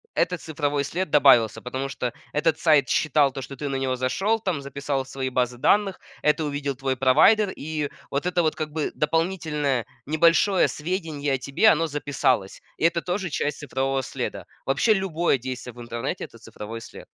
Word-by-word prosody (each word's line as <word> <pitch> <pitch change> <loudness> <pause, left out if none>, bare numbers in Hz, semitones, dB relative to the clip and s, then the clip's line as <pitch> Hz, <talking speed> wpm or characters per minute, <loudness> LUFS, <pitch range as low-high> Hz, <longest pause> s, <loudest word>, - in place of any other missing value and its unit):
этот 180 -2 0
цифровой 145 -2 -1
след 180 +5 -3
добавился, 130 -7 +5
потому 130 +2 -4
что 125 -2 -3 0.2
этот 155 +1 +1
сайт 155 -4 +4
считал 150 -2 +3
то 135 - -6
что 135 +1 -8
ты 145 +1 -4
на 135 - -2
него 130 -1 -1
зашел 190 - 0
там, 175 -7 -1
записал 140 -1 -3
свои 130 0 -4
базы 125 -1 0
данных, 195 +8 +2 0.2
это 150 +1 +2
увидел 145 -1 -2
твой 135 0 -2
провайдер, 160 - +5
и 150 -1 -3 0.2
вот 140 +4 -1
это 180 -1 +2
вот 155 - +1
как 155 -1 -4
бы 155 -1 -2
дополнительное 150 -5 0 0.2
небольшое 170 +5 +4
сведение 155 -4 -3
о 135 - +2
тебе, 140 +12 +3
оно 165 -2 +3
записалось. 135 -8 -1 0.2
И - - 0
это 170 0 +2
тоже 185 +1 -2
часть 150 0 -2
цифрового 135 -1 -1
следа. - - -5 0.2
Вообще 140 - +3
любое 175 -6 +1
действие 125 -1 -6
в 120 - -11
интернете- 120 0 -4
это - - -15
цифровой 115 +2 -8
след. - - -11
145 Hz, 180 wpm, -24 LUFS, 135-165 Hz, 0.2 s, добавился